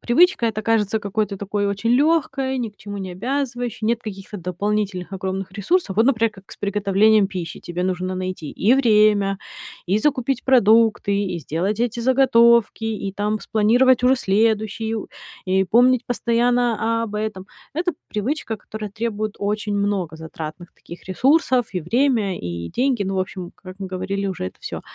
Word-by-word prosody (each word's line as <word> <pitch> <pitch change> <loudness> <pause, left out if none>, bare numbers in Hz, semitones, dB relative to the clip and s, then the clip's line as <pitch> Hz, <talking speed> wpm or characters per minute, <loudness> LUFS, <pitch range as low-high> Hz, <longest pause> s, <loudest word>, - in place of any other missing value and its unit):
привычка 290 0 +3
эта 215 -1 -2
кажется 220 -1 +1
какой-то 205 0 -2
такой 200 +1 -2
очень 200 +3 -1
лёгкой, 270 -1 +2
ни 235 -3 -2
к 205 - -31
чему 205 0 -7
не 190 -1 -5
обязывающей, 245 +1 -3
нет 230 +1 +1
каких-то 200 -1 -7
дополнительных 190 +1 -2
огромных 190 0 -4
ресурсов. 200 - 0
Вот 225 +3 +4
например, 230 -4 +2
как 195 -2 -17
с - - -12
приготовлением 205 +1 +3
пищи: 180 -4 -6
тебе 175 +1 -4
нужно 185 0 -2
найти 185 -4 -4
и 230 +6 +3
время, 210 -5 +3 0.5
и 190 +4 +2
закупить 265 -1 0
продукты, 225 -4 +4
и 180 -2 -3
сделать 175 +8 -2
эти 240 -1 -1
заготовки, 235 -3 +4
и 210 -3 -3
там 210 +1 -2
спланировать 245 +4 +3
уже 255 +1 +6
следующую, 220 0 0 0.4
и 190 +1 +2
помнить 245 +5 +4
постоянно 235 -1 +1
об 215 -2 -5
этом. 210 -3 -4 0.3
Это 350 +2 0 0.2
привычка, 225 +1 -2
которая 210 +1 -7
требует 215 0 -3
очень 210 0 -2
много 200 -5 -1
затратных 160 +1 -8
таких 170 - -13
ресурсов, 255 - +2
и 180 - -2
время, 225 - +1
и 85 -1 -5
деньги. 255 -3 +1
Ну, 195 0 -2
в - - +2
общем, 185 -1 -5
как 185 0 -12
мы 195 - -5
говорили 195 +2 -3
уже, 185 - -3
это 90 - -9
всё. - - -6
210 Hz, 160 wpm, -21 LUFS, 190-235 Hz, 0.5 s, уже